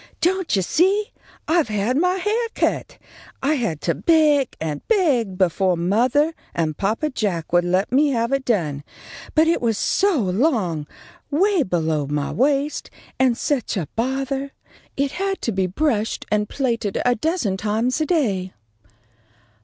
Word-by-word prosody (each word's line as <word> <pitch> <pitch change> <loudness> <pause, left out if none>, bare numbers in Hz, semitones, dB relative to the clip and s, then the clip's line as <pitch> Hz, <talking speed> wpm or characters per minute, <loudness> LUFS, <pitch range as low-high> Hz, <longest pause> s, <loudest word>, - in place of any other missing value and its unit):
"Don't 370 - +1
you 190 - +1
see? 385 - +2 0.4
I've 325 -3 +2
had 215 +3 0
my 360 +5 +2
hair 430 +5 0
cut. - - -1 0.5
I 285 +3 +3
had 200 - -2
to 170 - 0
beg 300 - +3
and 155 -2 -3
beg 270 - +2
befo' 185 0 +2
mothah 240 - +2 0.2
and 160 -2 -1
papa 220 - -1
Jack 185 -10 -2
would 175 0 +4
let 185 +4 +1
me 285 +4 +4
have 235 -2 0
it 275 -1 0
done; 160 - -1 0.5
but 315 +1 +5
it 335 - +2
was 225 -3 +1
so 390 - +2
long, 190 - 0 0.4
away 375 +4 +3
below 160 - 0
my 145 0 -2
waist, 280 +3 0 0.3
and 255 -3 +3
such 260 -8 -1
a 165 -6 -2
bothah. 270 +3 -2 0.5
It 275 0 0
had 390 +3 -2
to 230 - 0
be 190 -2 0
brushed 220 - -1
and 210 -1 +1
plaited 230 -7 -1
a 245 - +4
dozen 255 - -1
times 220 +8 -1
a 310 - 0
day." 200 - 0
245 Hz, 155 wpm, -22 LUFS, 190-305 Hz, 0.5 s, but